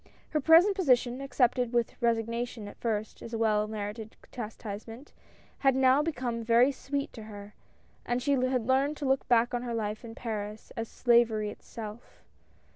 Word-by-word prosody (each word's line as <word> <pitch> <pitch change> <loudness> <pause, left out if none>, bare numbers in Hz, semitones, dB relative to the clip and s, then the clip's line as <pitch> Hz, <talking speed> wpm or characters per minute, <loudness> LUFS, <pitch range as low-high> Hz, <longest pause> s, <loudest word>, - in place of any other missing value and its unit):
Her 305 - 0
present 335 +7 +6
position, 255 -7 +2
accepted 250 -2 +1
with 235 -1 +1
resignation 230 -1 -1
at - - -12
first 220 -2 -2
as 230 - -6
a - - -1
well 215 -2 +2
merited 215 +1 -6 0.2
chastisement, 225 +2 -7 0.5
had 270 -2 +3
now 265 +1 +5
become 245 -7 -2
very 235 +4 +5
sweet 280 0 -4
to 225 - -9
her, 205 -1 -10 0.5
and 245 0 -1
she 275 +3 -1
had 255 -3 +1
learned 270 +4 +2
to 290 - -4
look 265 0 +1
back 240 0 +3
on 245 - -1
her 240 -1 -3
life 215 0 -3
in 225 -1 -9
Paris 215 -2 -5
as 225 0 -3
slavery 230 -3 +2
itself. 220 +1 -10
235 Hz, 165 wpm, -29 LUFS, 220-260 Hz, 0.5 s, present